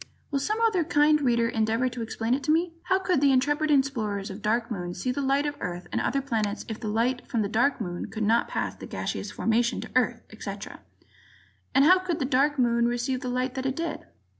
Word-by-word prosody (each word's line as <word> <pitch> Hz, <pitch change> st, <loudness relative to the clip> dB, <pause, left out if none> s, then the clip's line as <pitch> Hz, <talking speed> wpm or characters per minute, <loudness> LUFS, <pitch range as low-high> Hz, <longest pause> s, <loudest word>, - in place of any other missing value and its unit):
Will 280 Hz, -, +1 dB
some 425 Hz, +11 st, -1 dB
other 430 Hz, -7 st, +3 dB
kind 300 Hz, -1 st, +3 dB
Reader 235 Hz, -3 st, +2 dB
endeavor 225 Hz, +2 st, +1 dB
to 245 Hz, -1 st, -5 dB
explain 225 Hz, +1 st, -1 dB
it 275 Hz, -, 0 dB
to 305 Hz, -, +3 dB
me? 330 Hz, +2 st, +1 dB
How 375 Hz, +1 st, +3 dB
could 365 Hz, -6 st, +1 dB
the 280 Hz, -1 st, +5 dB
intrepid 295 Hz, +4 st, +2 dB
explorers 225 Hz, -9 st, 0 dB
on 190 Hz, -, -7 dB
the -, -, -14 dB
Dark 230 Hz, +3 st, 0 dB
Moon 175 Hz, -4 st, -4 dB
see 255 Hz, -, -2 dB
the 280 Hz, -, -2 dB
light 275 Hz, +1 st, +2 dB
of 290 Hz, -, -1 dB
Earth 175 Hz, 0 st, -4 dB
and -, -, 0 dB
the -, -, 0 dB
other 275 Hz, 0 st, 0 dB
planets 215 Hz, -6 st, -2 dB
if 220 Hz, -1 st, -5 dB
the 220 Hz, -, -5 dB
light 235 Hz, +4 st, 0 dB
from 225 Hz, -3 st, 0 dB
the -, -, -1 dB
Dark 240 Hz, +7 st, +1 dB
Moon 175 Hz, -5 st, -4 dB
could 220 Hz, -, -3 dB
not 225 Hz, +3 st, +3 dB
pass -, -, -2 dB
the -, -, -10 dB
gaseous -, -, -4 dB
formation 235 Hz, +1 st, +1 dB
to -, -, -9 dB
Earth, 245 Hz, -2 st, +1 dB
etc.? 205 Hz, -2 st, -7 dB, 1.0 s
And 275 Hz, -, +6 dB
how 370 Hz, +4 st, +7 dB
could 365 Hz, -3 st, -2 dB
the 285 Hz, -, -1 dB
Dark 280 Hz, +3 st, +2 dB
Moon 235 Hz, -2 st, +3 dB
receive 245 Hz, +2 st, -1 dB
the 255 Hz, -, -3 dB
light 255 Hz, +1 st, -1 dB
that 265 Hz, 0 st, -2 dB
it 265 Hz, -, -1 dB
did? 335 Hz, +2 st, -4 dB
250 Hz, 240 wpm, -27 LUFS, 225-285 Hz, 1.0 s, how